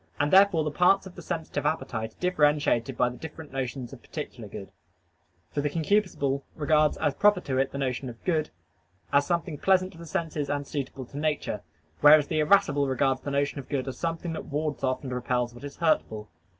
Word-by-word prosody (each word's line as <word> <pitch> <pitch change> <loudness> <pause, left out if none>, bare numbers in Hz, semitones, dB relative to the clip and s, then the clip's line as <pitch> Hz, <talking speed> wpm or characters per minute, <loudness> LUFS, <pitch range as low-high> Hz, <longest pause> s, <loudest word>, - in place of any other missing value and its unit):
And 145 +3 +1
therefore 190 -4 +6
the 150 - -2
parts 180 +5 +4
of 190 - -10
the - - -10
sensitive 160 -1 -3
appetite 110 -8 -2
are - - -34
differentiated 145 -8 +2
by 125 - +3
the 125 - -9
different 160 -1 -9
notions 130 -2 -4
of - - -11
particular - - -7
good: - - -8 0.8
for 145 - -1
the 150 - 0
concupiscible 160 -4 0
regards 150 0 +2
as 145 - +1
proper 205 +2 +4
to 130 -1 -1
it 135 - +1
the - - -5
notion 130 -1 -2
of 115 -1 -12
good, 155 -4 0 0.6
as 140 0 +4
something 170 -4 -1
pleasant 185 -1 +3
to 165 - -15
the 170 - -9
senses 155 -2 -2
and 145 0 -1
suitable 135 -2 -5
to 140 +4 -8
nature: 150 -1 -1 0.4
whereas 150 0 +7
the 155 - 0
irascible 150 -3 +3
regards 130 0 +1
the - - -5
notion 140 +1 0
of 135 - -10
good 135 -2 -2
as 130 - -5
something 165 0 -2
that - - -5
wards 150 0 -3
off 130 +2 0
and 130 -2 -4
repels 125 -1 -1
what 120 - -13
is 145 0 -8
hurtful. 110 -10 0
145 Hz, 205 wpm, -27 LUFS, 135-165 Hz, 0.8 s, whereas